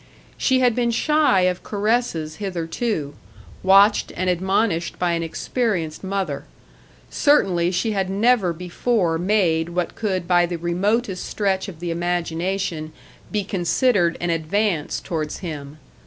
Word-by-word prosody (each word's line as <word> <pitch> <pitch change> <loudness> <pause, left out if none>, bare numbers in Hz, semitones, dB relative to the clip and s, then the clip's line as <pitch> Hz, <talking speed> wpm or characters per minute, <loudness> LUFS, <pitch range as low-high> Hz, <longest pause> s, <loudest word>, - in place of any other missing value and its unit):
She 260 -1 +2
had 245 -2 +4
been 240 0 +1
shy 295 -4 +3
of 180 0 +1
caresses 205 -7 -1
hitherto, 175 -3 -3 0.5
watched 195 +2 +5
and 185 0 +1
admonished 190 -1 0
by 180 -1 0
an 170 0 0
experienced 165 -1 -2
mother; 190 -7 -3 0.7
certainly 185 - +3
she 185 +5 0
had 195 -3 -1
never 205 -1 +3
before 180 +1 -1
made 175 -4 +1
what 175 0 -2
could 185 -5 -2
by 175 -1 +4
the 175 0 -3
remotest 190 +4 0
stretch 195 -2 -1
of 175 -5 -9
the 175 0 -3
imagination 175 -1 -2 0.4
be 210 -2 0
considered 185 0 +1
an 175 0 -1
advance 165 +1 0
towards 155 -4 -4
him. 150 -3 -6
180 Hz, 130 wpm, -22 LUFS, 170-210 Hz, 0.7 s, watched